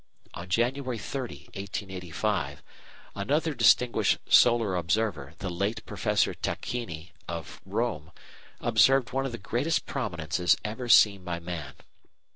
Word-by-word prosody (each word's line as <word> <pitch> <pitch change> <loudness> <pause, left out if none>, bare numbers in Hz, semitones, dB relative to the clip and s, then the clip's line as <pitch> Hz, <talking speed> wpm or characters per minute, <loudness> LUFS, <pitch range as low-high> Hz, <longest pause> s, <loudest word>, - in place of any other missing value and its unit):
On 85 +1 -8
January 125 +4 0
30, 125 +3 -6
1885, 95 -5 -3 0.5
another 150 +10 0
distinguished 120 0 +4
solar 115 -5 +5
observer, 85 -5 -1
the 95 - -4
late 100 +6 -2
Professor - - +1
Tacchini 90 -9 -4 0.2
of 85 -2 -6
Rome, 95 -6 -2 0.5
observed 135 -2 +4
one 135 +1 0
of - - -6
the 120 - -5
greatest 120 +10 -1
prominences 90 - 0
ever 115 +3 -4
seen 100 -3 +6
by 85 -2 -3
man. 85 -5 -6
105 Hz, 115 wpm, -28 LUFS, 85-120 Hz, 0.5 s, seen